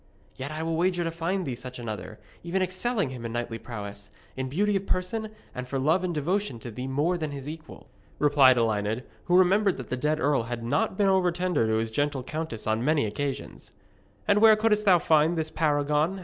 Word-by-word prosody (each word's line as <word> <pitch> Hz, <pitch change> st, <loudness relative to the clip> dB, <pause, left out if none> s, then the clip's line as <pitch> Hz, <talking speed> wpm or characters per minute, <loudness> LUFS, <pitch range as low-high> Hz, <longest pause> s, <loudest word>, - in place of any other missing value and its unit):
'Yet 135 Hz, +2 st, -5 dB
I 155 Hz, +1 st, -4 dB
will 165 Hz, 0 st, -1 dB
wager 175 Hz, 0 st, +1 dB
to 165 Hz, -, -2 dB
find 170 Hz, +3 st, -2 dB
thee 135 Hz, -, -3 dB
such 125 Hz, +1 st, -8 dB
another, 110 Hz, -2 st, -6 dB, 0.2 s
even 185 Hz, +3 st, -1 dB
excelling 185 Hz, -, -1 dB
him 125 Hz, -2 st, -7 dB
in 115 Hz, -, -4 dB
knightly 120 Hz, -1 st, -3 dB
prowess, 105 Hz, -3 st, -8 dB, 0.3 s
in 130 Hz, 0 st, -3 dB
beauty 205 Hz, +8 st, +1 dB
of 195 Hz, 0 st, -2 dB
person, 215 Hz, +4 st, -1 dB, 0.2 s
and 125 Hz, 0 st, -6 dB
for 135 Hz, -, -2 dB
love 155 Hz, +7 st, +2 dB
and 180 Hz, -, -1 dB
devotion 170 Hz, -, -1 dB
to 120 Hz, -, -7 dB
thee 125 Hz, +4 st, -5 dB
more 150 Hz, +7 st, 0 dB
than 155 Hz, -2 st, -2 dB
his 140 Hz, -1 st, -7 dB
equal,' 160 Hz, +1 st, -9 dB, 0.3 s
replied 140 Hz, -3 st, +5 dB
Elined, 110 Hz, 0 st, 0 dB, 0.2 s
who 180 Hz, 0 st, +4 dB
remembered 190 Hz, +1 st, +4 dB
that 125 Hz, -3 st, -8 dB
the -, -, +1 dB
dead 150 Hz, +4 st, 0 dB
earl 145 Hz, -3 st, +2 dB
had 120 Hz, -1 st, -4 dB
not 140 Hz, +9 st, 0 dB
been 205 Hz, -, +3 dB
over 190 Hz, -2 st, +3 dB
tender 175 Hz, -9 st, 0 dB
to 110 Hz, -, +1 dB
his 110 Hz, 0 st, -1 dB
gentle 145 Hz, +1 st, -1 dB
countess 155 Hz, -6 st, -5 dB
on 110 Hz, +2 st, 0 dB
many 150 Hz, -2 st, +2 dB
occasions. 135 Hz, +6 st, -4 dB, 0.6 s
'And 205 Hz, 0 st, +4 dB
where 220 Hz, -1 st, +8 dB
couldst 215 Hz, -1 st, +2 dB
thou 185 Hz, -3 st, +7 dB
find 160 Hz, 0 st, +3 dB
this 160 Hz, 0 st, -2 dB
paragon?' 150 Hz, +3 st, +1 dB
150 Hz, 210 wpm, -27 LUFS, 125-180 Hz, 0.6 s, where